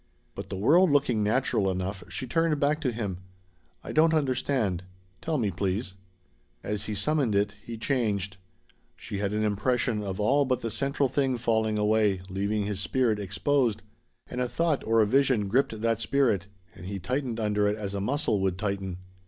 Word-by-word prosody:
But -, -, -7 dB
the 95 Hz, -, -4 dB
world 165 Hz, -, +5 dB
looking 135 Hz, -6 st, +2 dB
natural 105 Hz, -2 st, +1 dB
enough, 95 Hz, +1 st, -3 dB
she -, -, -3 dB
turned 165 Hz, +3 st, +1 dB
back 145 Hz, +2 st, +2 dB
to 130 Hz, -5 st, 0 dB
him. 105 Hz, -6 st, -4 dB, 0.6 s
"I -, -, -6 dB
don't 160 Hz, +1 st, +4 dB
understand. 130 Hz, -, 0 dB, 0.4 s
Tell 160 Hz, -1 st, -1 dB
me, 110 Hz, -6 st, 0 dB
please." 95 Hz, +3 st, -2 dB, 0.7 s
As 105 Hz, -1 st, -3 dB
he 105 Hz, -, -3 dB
summoned 140 Hz, -2 st, +1 dB
it, 100 Hz, +1 st, +1 dB
he 115 Hz, -1 st, -7 dB
changed. 105 Hz, -7 st, -1 dB, 0.6 s
She 100 Hz, -3 st, -6 dB
had 100 Hz, -1 st, -1 dB
an 105 Hz, +1 st, 0 dB
impression 110 Hz, +2 st, 0 dB
of 95 Hz, -1 st, -4 dB
all 135 Hz, +7 st, +3 dB
but 130 Hz, -2 st, 0 dB
the 115 Hz, -, -3 dB
central 140 Hz, +3 st, +1 dB
thing 135 Hz, -1 st, 0 dB
falling 110 Hz, -2 st, +1 dB
away, 105 Hz, -2 st, +2 dB
leaving 100 Hz, +2 st, -1 dB
his 100 Hz, -2 st, -3 dB
spirit 110 Hz, +4 st, +1 dB
exposed. 105 Hz, +5 st, 0 dB, 0.4 s
And 125 Hz, -, -4 dB
a 125 Hz, -, -1 dB
thought 165 Hz, -1 st, 0 dB
or 115 Hz, 0 st, +4 dB
a -, -, +2 dB
vision 130 Hz, -2 st, +2 dB
gripped 115 Hz, 0 st, +1 dB
that 115 Hz, -1 st, +1 dB
spirit, 115 Hz, -9 st, +1 dB, 0.3 s
and 90 Hz, +2 st, -10 dB
he 100 Hz, 0 st, -4 dB
tightened 120 Hz, +5 st, -2 dB
under 105 Hz, -1 st, +1 dB
it 105 Hz, +1 st, 0 dB
as 100 Hz, -2 st, -4 dB
a 100 Hz, -, -2 dB
muscle 110 Hz, -3 st, 0 dB
would 95 Hz, -2 st, 0 dB
tighten. 100 Hz, -2 st, -3 dB
110 Hz, 180 wpm, -27 LUFS, 100-130 Hz, 0.7 s, world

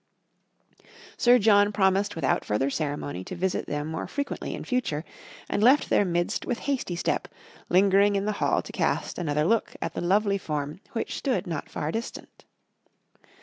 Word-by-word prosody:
Sir 245 Hz, +1 st, +5 dB
John 205 Hz, -2 st, +5 dB
promised 195 Hz, 0 st, +2 dB
without 160 Hz, -5 st, 0 dB
further 135 Hz, +7 st, 0 dB
ceremony 145 Hz, -, -3 dB
to -, -, -6 dB
visit 185 Hz, +1 st, -1 dB
them 145 Hz, 0 st, -2 dB
more 160 Hz, +1 st, -4 dB
frequently 285 Hz, 0 st, -4 dB
in -, -, -7 dB
future, 205 Hz, -, -1 dB, 0.4 s
and 205 Hz, -, -1 dB
left 260 Hz, +6 st, +4 dB
their -, -, +5 dB
midst 175 Hz, -1 st, -1 dB
with 245 Hz, -, -2 dB
hasty 265 Hz, -10 st, -1 dB
step, 170 Hz, -, -1 dB, 0.4 s
lingering 200 Hz, +2 st, +4 dB
in 195 Hz, 0 st, 0 dB
the 215 Hz, -, +1 dB
hall -, -, +2 dB
to -, -, -9 dB
cast -, -, -1 dB
another 150 Hz, -3 st, 0 dB
look 225 Hz, +4 st, +1 dB
at -, -, -3 dB
the -, -, -4 dB
lovely 200 Hz, +3 st, +2 dB
form 150 Hz, -1 st, -4 dB
which 230 Hz, -, -3 dB
stood 260 Hz, -5 st, -1 dB
not 165 Hz, -5 st, -4 dB
far 150 Hz, -, -3 dB
distant. 225 Hz, +4 st, -7 dB
190 Hz, 165 wpm, -26 LUFS, 155-215 Hz, 0.4 s, Sir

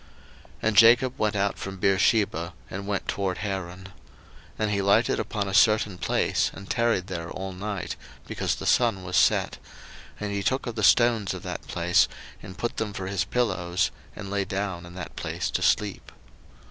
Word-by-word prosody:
01:028:010 -, -, -25 dB, 0.5 s
And 110 Hz, -2 st, +1 dB
Jacob 120 Hz, +3 st, +6 dB
went 105 Hz, -1 st, +1 dB
out 100 Hz, 0 st, 0 dB
from 95 Hz, 0 st, -6 dB
Beersheba, 95 Hz, -2 st, +2 dB, 0.2 s
and 100 Hz, +1 st, -5 dB
went 100 Hz, -2 st, -2 dB
toward 95 Hz, -2 st, -1 dB
Haran. 95 Hz, -3 st, -4 dB
01:028:011 -, -, -10 dB, 0.7 s
And 110 Hz, -1 st, 0 dB
he 100 Hz, -1 st, +1 dB
lighted 100 Hz, +4 st, +3 dB
upon 100 Hz, -3 st, -2 dB
a 95 Hz, -, -4 dB
certain 105 Hz, -2 st, +3 dB
place, -, -, +1 dB
and 100 Hz, 0 st, -10 dB
tarried 115 Hz, -6 st, +1 dB
there 85 Hz, -3 st, -5 dB
all 95 Hz, 0 st, -5 dB
night, 95 Hz, -1 st, -4 dB, 0.3 s
because -, -, -2 dB
the -, -, -7 dB
sun 115 Hz, -6 st, +2 dB
was 90 Hz, 0 st, -4 dB
set; 90 Hz, -, +3 dB, 0.6 s
and 105 Hz, -1 st, -3 dB
he 100 Hz, -, -1 dB
took 130 Hz, +7 st, 0 dB
of 120 Hz, -, -4 dB
the 110 Hz, -, -4 dB
stones 115 Hz, -2 st, +4 dB
of -, -, -8 dB
that -, -, -6 dB
place, 90 Hz, 0 st, +3 dB, 0.3 s
and 95 Hz, 0 st, -10 dB
put 120 Hz, +3 st, -3 dB
them 105 Hz, -2 st, -2 dB
for 95 Hz, -, -5 dB
his 95 Hz, -1 st, -1 dB
pillows, 95 Hz, -6 st, 0 dB, 0.2 s
and 100 Hz, -1 st, -7 dB
lay 100 Hz, -1 st, 0 dB
down 95 Hz, -3 st, -4 dB
in 85 Hz, -, -12 dB
that 90 Hz, -4 st, -7 dB
place -, -, -3 dB
to -, -, -1 dB
sleep. 105 Hz, -2 st, 0 dB
100 Hz, 185 wpm, -26 LUFS, 95-105 Hz, 0.7 s, Jacob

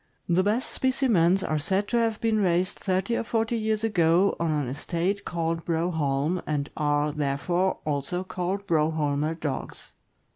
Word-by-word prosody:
The 175 Hz, +1 st, +3 dB
best 215 Hz, +6 st, 0 dB
specimens 210 Hz, -9 st, +2 dB
are 155 Hz, -1 st, 0 dB
said 190 Hz, +6 st, 0 dB
to 240 Hz, -, +1 dB
have 225 Hz, -2 st, +1 dB
been 225 Hz, -1 st, +1 dB
raised 180 Hz, -1 st, +1 dB
thirty 190 Hz, +4 st, 0 dB
or -, -, -1 dB
forty 225 Hz, +1 st, 0 dB
years 220 Hz, -1 st, -1 dB
ago 180 Hz, -3 st, +3 dB
on 170 Hz, -, 0 dB
an 150 Hz, -4 st, 0 dB
estate 170 Hz, +9 st, -2 dB
called 165 Hz, -1 st, -2 dB
Broholm, 160 Hz, -1 st, 0 dB
and 145 Hz, -1 st, -2 dB
are, 145 Hz, 0 st, +1 dB
therefore, 150 Hz, +6 st, 0 dB
also 150 Hz, +5 st, -1 dB
called 185 Hz, +2 st, -3 dB
Broholmer 155 Hz, -2 st, 0 dB
Dogs. 145 Hz, -4 st, -5 dB
175 Hz, 150 wpm, -26 LUFS, 155-200 Hz, -, The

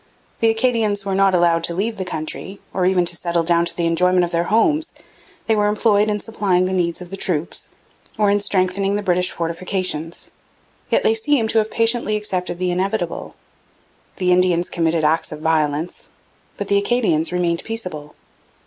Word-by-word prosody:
The 225 Hz, -, +3 dB
Acadians 225 Hz, -3 st, 0 dB
were 195 Hz, -, -1 dB
not 195 Hz, -1 st, +3 dB
allowed 170 Hz, -1 st, +3 dB
to 170 Hz, -, -3 dB
leave 215 Hz, +4 st, -2 dB
the 190 Hz, -, -4 dB
country, 180 Hz, +4 st, -5 dB
or 185 Hz, -1 st, +1 dB
even 185 Hz, -2 st, +2 dB
to 175 Hz, -, +1 dB
settle 170 Hz, -1 st, -1 dB
down 170 Hz, 0 st, +2 dB
to 170 Hz, -, -4 dB
the 170 Hz, -, 0 dB
enjoyment 180 Hz, +2 st, +3 dB
of 175 Hz, -, -2 dB
their 170 Hz, 0 st, 0 dB
homes; 295 Hz, -, +1 dB, 0.5 s
they 220 Hz, -, +2 dB
were 210 Hz, -1 st, +2 dB
employed 210 Hz, 0 st, +2 dB
in 210 Hz, 0 st, -1 dB
supplying 195 Hz, -5 st, 0 dB
the 185 Hz, -, -2 dB
needs 175 Hz, -1 st, -1 dB
of 175 Hz, -, -14 dB
the -, -, -4 dB
troops, 170 Hz, -4 st, -3 dB, 0.5 s
or 210 Hz, -2 st, +3 dB
in 205 Hz, -, +2 dB
strengthening 195 Hz, 0 st, +1 dB
the 205 Hz, -, -2 dB
British 180 Hz, -1 st, +2 dB
fortifications; 170 Hz, -1 st, -3 dB, 0.6 s
yet -, -, +2 dB
they 450 Hz, -, +4 dB
seem 295 Hz, -, +1 dB
to 225 Hz, -, +3 dB
have 215 Hz, 0 st, -1 dB
patiently 230 Hz, -1 st, +1 dB
accepted 185 Hz, -4 st, -1 dB
the 180 Hz, 0 st, -1 dB
inevitable. 185 Hz, 0 st, -2 dB, 0.8 s
The 180 Hz, -1 st, 0 dB
Indians 180 Hz, -1 st, +2 dB
committed 165 Hz, -1 st, 0 dB
acts 155 Hz, +2 st, +1 dB
of 155 Hz, 0 st, -7 dB
violence, 155 Hz, 0 st, -1 dB, 0.5 s
but 205 Hz, -, -4 dB
the 200 Hz, 0 st, +3 dB
Acadians 200 Hz, -8 st, +1 dB
remained 175 Hz, -1 st, 0 dB
peaceable. 180 Hz, -10 st, -6 dB
185 Hz, 180 wpm, -20 LUFS, 170-210 Hz, 0.8 s, they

